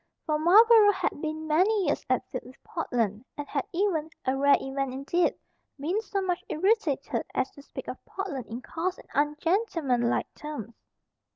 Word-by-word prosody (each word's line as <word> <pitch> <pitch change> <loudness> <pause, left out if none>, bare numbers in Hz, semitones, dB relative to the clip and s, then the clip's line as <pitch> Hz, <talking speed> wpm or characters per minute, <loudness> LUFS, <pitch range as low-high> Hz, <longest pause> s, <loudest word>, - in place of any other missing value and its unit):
For 305 -2 0
Marlborough 420 +5 +7
had 370 -5 -2
been 315 0 -3
many 370 +6 +3
years - - 0
at - - +1
feud - - -5
with 260 - -16
Portland, 230 - -2
and 290 -1 -5
had 280 - -2
even 345 -4 0 0.2
a 260 - +1
rare 280 +1 +5
event 270 -1 -3
indeed 310 +6 +1 0.4
been 350 +10 0
so 395 -3 -2
much 360 -2 -1
irritated 305 - +1
as 260 - 0
to 280 - -14
speak - - -9
of - - -7
Portland 310 - -5
in 235 +3 -7
coarse 355 +3 -3
and - - -16
ungentlemanlike 295 - +1
terms. 290 -7 -7
310 Hz, 165 wpm, -28 LUFS, 270-370 Hz, 0.4 s, Marlborough